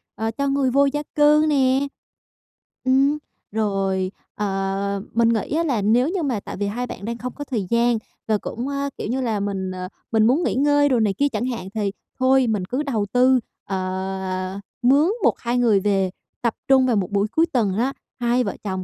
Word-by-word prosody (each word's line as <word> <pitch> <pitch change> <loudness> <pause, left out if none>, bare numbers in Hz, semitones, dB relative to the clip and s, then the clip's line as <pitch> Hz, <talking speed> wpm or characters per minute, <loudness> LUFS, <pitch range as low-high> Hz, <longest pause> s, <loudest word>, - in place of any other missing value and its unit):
ờ, 220 +1 -2
cho 280 +4 -2
người 275 -2 +1
vô 280 +2 +4
gia 295 +2 -1
cư 300 +1 +5
nè. 270 -1 +2 1.0
Ừm, 275 +3 +3 0.3
rồi, 195 -3 0 0.2
ờ, 195 0 -1
mình 230 0 +3
nghĩ 230 +6 0
á 335 - +2
là 255 -10 0
nếu 235 +7 +3
như 360 -2 -1
mà 250 -7 0
tại - - -8
vì 205 +1 -1
hai 245 +4 -3
bạn 200 - -7
đang 235 +1 -3
không 250 +1 -5
có 290 - -6
thời 230 -8 -2
gian 235 0 +3 0.3
và 215 -1 +2
cũng 240 +5 -5
á, 280 0 -2
kiểu - - -4
như 255 +4 -1
là, 225 -4 0
mình, 195 -2 -2
ờ, 185 0 -5 0.2
mình 220 -1 +4
muốn 285 +8 +3
nghỉ - - 0
ngơi 290 +1 +3
đồ 250 -3 +3
này 210 -3 +2
kia 285 +7 +1
chẳng 220 0 -2
hạn, 235 -7 -4
thì 205 -2 0 0.3
thôi 260 0 +4
mình 210 -5 0
cứ 255 +9 -2
đầu 225 -8 -1
tư, 255 +1 +5 0.3
ờ, 190 0 -3 0.2
mướn 285 +9 +4
1-2 240 +1 +1
người 230 -5 +4
về 195 -1 +1 0.3
tập 235 -2 +1
trung 265 -1 +5
vào 245 - +2
một 195 -2 -1
buổi 200 +1 +1
cuối 325 - +3
tuần 205 -7 +1
á, 260 +4 +1 0.3
hai 245 +1 +2
vợ - - -3
chồng 190 -2 -3
235 Hz, 205 wpm, -22 LUFS, 200-265 Hz, 1.0 s, cư